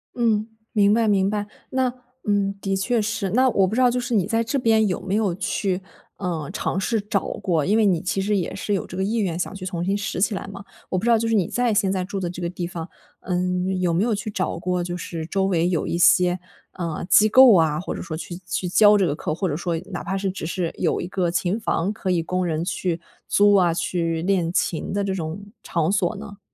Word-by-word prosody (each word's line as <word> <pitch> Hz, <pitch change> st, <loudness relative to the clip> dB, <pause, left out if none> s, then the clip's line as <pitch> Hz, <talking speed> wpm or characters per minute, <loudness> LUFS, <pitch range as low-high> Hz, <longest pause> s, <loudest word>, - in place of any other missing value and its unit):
嗯， 220 Hz, -3 st, +1 dB, 0.3 s
明 205 Hz, -1 st, +4 dB
白 225 Hz, 0 st, +2 dB
明 195 Hz, -2 st, +3 dB
白， 205 Hz, 0 st, -2 dB, 0.2 s
那 260 Hz, -1 st, 0 dB, 0.3 s
嗯， 200 Hz, -1 st, +1 dB
的 195 Hz, -1 st, -1 dB
确 225 Hz, +4 st, +1 dB
是。 210 Hz, -2 st, -2 dB
那 255 Hz, +4 st, +4 dB
我 195 Hz, -5 st, +3 dB
不 210 Hz, -, -3 dB
知 255 Hz, -, +2 dB
道 250 Hz, -, +6 dB
就 250 Hz, -, 0 dB
是 240 Hz, 0 st, -3 dB
你 200 Hz, -5 st, +3 dB
在 225 Hz, +3 st, +1 dB
这 230 Hz, +5 st, -1 dB
边 225 Hz, -4 st, +3 dB
有 180 Hz, -, -1 dB
没 190 Hz, +1 st, -4 dB
有 210 Hz, -4 st, +1 dB
去， 195 Hz, 0 st, -1 dB, 0.4 s
呃， 165 Hz, -6 st, -3 dB
尝 190 Hz, -, -2 dB
试 225 Hz, +3 st, 0 dB
找 200 Hz, -1 st, -1 dB
过， 175 Hz, -7 st, -1 dB
因 210 Hz, +3 st, +2 dB
为 220 Hz, -, +4 dB
你 180 Hz, -5 st, +2 dB
其 180 Hz, +2 st, -1 dB
实 205 Hz, +2 st, +1 dB
也 185 Hz, -2 st, -1 dB
是 205 Hz, +2 st, -2 dB
有 195 Hz, -, -1 dB
这 180 Hz, -, -8 dB
个 190 Hz, -, 0 dB
意 210 Hz, +4 st, -1 dB
愿 185 Hz, -7 st, 0 dB
想 180 Hz, -, -3 dB
去 195 Hz, -2 st, -7 dB
重 175 Hz, -2 st, -3 dB
新 195 Hz, +2 st, +1 dB
拾 205 Hz, -2 st, -3 dB
起 210 Hz, +3 st, +2 dB
来 195 Hz, -, -5 dB
嘛。 195 Hz, 0 st, -9 dB, 0.3 s
我 185 Hz, -, 0 dB
不 185 Hz, -, -3 dB
知 240 Hz, -, +2 dB
道 230 Hz, -, +6 dB
就 225 Hz, +1 st, -1 dB
是 225 Hz, -, +2 dB
你 190 Hz, -6 st, +2 dB
在 245 Hz, -2 st, +1 dB
现 200 Hz, -2 st, +2 dB
在 190 Hz, -1 st, -1 dB
住 195 Hz, +1 st, -4 dB
的 180 Hz, -2 st, -2 dB
这 180 Hz, +1 st, -7 dB
个 170 Hz, -, -1 dB
地 180 Hz, 0 st, -4 dB
方， 170 Hz, -1 st, -6 dB, 0.3 s
嗯， 180 Hz, +1 st, -1 dB
有 180 Hz, -2 st, +1 dB
没 175 Hz, +4 st, +2 dB
有 235 Hz, 0 st, +1 dB
去 210 Hz, +2 st, -4 dB
找 185 Hz, -4 st, -2 dB
过 180 Hz, +1 st, -1 dB
就 175 Hz, 0 st, -4 dB
是 165 Hz, -2 st, -5 dB
周 195 Hz, +2 st, 0 dB
围 175 Hz, -2 st, +1 dB
有 170 Hz, -3 st, 0 dB
一 170 Hz, -, -1 dB
些， 180 Hz, +1 st, +4 dB, 0.4 s
嗯， 170 Hz, -2 st, -3 dB
机 215 Hz, +1 st, +6 dB
构 255 Hz, -1 st, +8 dB
啊， 160 Hz, -3 st, +3 dB
或 180 Hz, -, -4 dB
者 -, -, -6 dB
说 160 Hz, -3 st, -5 dB
去 175 Hz, +1 st, -7 dB
去 185 Hz, -1 st, -2 dB
教 210 Hz, +3 st, +6 dB
这 195 Hz, -, +3 dB
个 145 Hz, -, 0 dB
课， 155 Hz, -, -3 dB
或 190 Hz, +3 st, -1 dB
者 150 Hz, -, -2 dB
说 170 Hz, +1 st, -2 dB
哪 175 Hz, -, -4 dB
怕 190 Hz, +3 st, -2 dB
是 195 Hz, 0 st, -1 dB
只 185 Hz, -4 st, -6 dB
是 170 Hz, 0 st, -2 dB
有 -, -, 0 dB
一 -, -, -4 dB
个 180 Hz, -1 st, -1 dB
琴 180 Hz, +4 st, 0 dB
房 205 Hz, -2 st, -1 dB
可 210 Hz, -3 st, -4 dB
以 175 Hz, -2 st, +1 dB
供 185 Hz, +2 st, -1 dB
人 165 Hz, -1 st, -1 dB
去 175 Hz, -2 st, -2 dB, 0.3 s
租 205 Hz, 0 st, +4 dB
啊， 180 Hz, -4 st, +4 dB
去 165 Hz, -1 st, -1 dB
练 180 Hz, -3 st, +1 dB
琴 170 Hz, -2 st, -1 dB
的 200 Hz, +1 st, 0 dB
这 195 Hz, -1 st, -1 dB
种 175 Hz, +2 st, -5 dB, 0.2 s
场 165 Hz, 0 st, 0 dB
所 195 Hz, 0 st, +1 dB
呢？ 200 Hz, 0 st, -9 dB
190 Hz, 275 characters per minute, -23 LUFS, 175-210 Hz, 0.4 s, 构